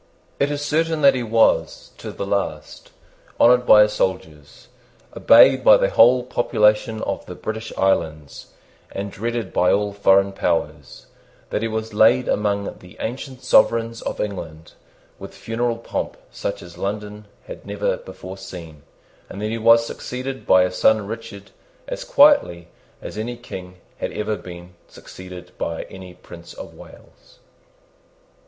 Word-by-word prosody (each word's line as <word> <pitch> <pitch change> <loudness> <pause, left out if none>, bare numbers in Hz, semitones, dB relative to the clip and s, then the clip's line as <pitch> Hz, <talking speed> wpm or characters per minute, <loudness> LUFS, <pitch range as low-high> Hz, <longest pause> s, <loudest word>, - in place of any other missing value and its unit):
It 140 - +1
is 145 0 -3
certain 160 +1 0
that 140 -1 +6
he 130 - -2
was, 115 -1 +1
to - - -7
the 100 - -5
last, 80 -7 -4 0.5
honoured 125 +1 +5
by 105 0 +8
his 105 0 -1
soldiers, 80 -7 -4 0.5
obeyed 130 +3 +6
by 110 - +7
the 95 - 0
whole 125 +2 +5
population 110 -2 +1
of - - -3
the - - -8
British 110 +1 -6
islands, 80 -6 -1 0.4
and 100 +1 -5
dreaded 115 0 -4
by 90 - +3
all 105 0 0
foreign 100 -1 +3
powers, 75 -6 -3 0.5
that - - -1
he 115 - -1
was 110 0 -4
laid 115 +4 +4
among 100 -1 -1
the 90 0 -16
ancient 130 +2 -6
sovereigns 115 0 +2
of - - -5
England 80 -6 -6 0.5
with - - -10
funeral 115 +1 -2
pomp 115 - -5
such 100 0 -5
as 85 -1 -13
London 105 +1 -5 0.2
had - - -10
never - - -1
before 95 - -10
seen, 85 -6 -10 0.5
and 100 - -9
that 105 +1 -3
he 115 - -3
was 115 +1 +5
succeeded 130 +3 -6
by 95 0 +6
his 90 0 -3
son 110 -2 +3
Richard 105 -2 -9 0.4
as - - -5
quietly 280 - +3 0.3
as 105 - -7
any 120 +2 -4
King 90 -6 -10 0.2
had - - -3
ever 105 0 -2
been 90 -2 -11
succeeded 90 -1 -12
by 85 -1 -3
any 95 -2 -11
Prince 85 0 -13
of - - -10
Wales. - - -17
105 Hz, 150 wpm, -21 LUFS, 95-120 Hz, 0.5 s, by